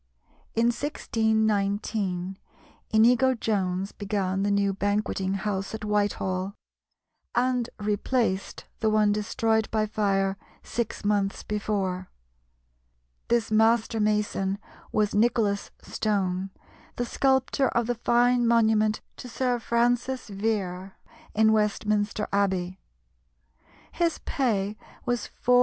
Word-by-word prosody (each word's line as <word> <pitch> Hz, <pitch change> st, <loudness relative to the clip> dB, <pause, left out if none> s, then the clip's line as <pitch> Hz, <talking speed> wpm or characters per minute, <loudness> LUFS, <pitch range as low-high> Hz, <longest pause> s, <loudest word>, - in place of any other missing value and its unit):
In 230 Hz, +1 st, +3 dB
1619 210 Hz, -6 st, 0 dB, 0.5 s
Inigo 245 Hz, +4 st, +4 dB
Jones 195 Hz, -4 st, -1 dB
began 195 Hz, -2 st, -2 dB
the 200 Hz, -, +1 dB
new 200 Hz, -1 st, +2 dB
Banqueting 195 Hz, -1 st, -1 dB
House 195 Hz, +1 st, -2 dB
at 220 Hz, -, -6 dB
Whitehall, 200 Hz, -2 st, -1 dB, 0.8 s
and 250 Hz, -1 st, +1 dB
replaced 210 Hz, 0 st, -1 dB
the 220 Hz, -, +2 dB
one 215 Hz, -1 st, +3 dB
destroyed 220 Hz, +1 st, 0 dB
by 215 Hz, -1 st, +1 dB
fire 195 Hz, -2 st, 0 dB, 0.3 s
six 230 Hz, -2 st, -3 dB
months 200 Hz, -1 st, 0 dB
before. 195 Hz, -3 st, -2 dB, 1.2 s
This 235 Hz, -2 st, +1 dB
master 225 Hz, +1 st, +3 dB
mason 210 Hz, -2 st, 0 dB, 0.3 s
was 210 Hz, -1 st, +1 dB
Nicholas 215 Hz, -2 st, +2 dB
Stone, 195 Hz, -3 st, -1 dB, 0.5 s
the 245 Hz, -, -1 dB
sculptor 265 Hz, +1 st, +2 dB
of 235 Hz, -1 st, 0 dB
the 245 Hz, -, 0 dB
fine 240 Hz, +1 st, +3 dB
monument 220 Hz, -2 st, +3 dB, 0.2 s
to 250 Hz, -, -8 dB
Sir 245 Hz, 0 st, 0 dB
Francis 245 Hz, +2 st, 0 dB
Vere 195 Hz, -3 st, -2 dB, 0.4 s
in 220 Hz, 0 st, +5 dB
Westminster 210 Hz, 0 st, 0 dB
Abbey. 190 Hz, -2 st, 0 dB, 1.1 s
His 340 Hz, -1 st, 0 dB
pay 210 Hz, -6 st, 0 dB, 0.3 s
was 245 Hz, -1 st, -1 dB, 0.2 s
4s. 250 Hz, 0 st, +6 dB
210 Hz, 105 wpm, -26 LUFS, 195-230 Hz, 1.2 s, 4s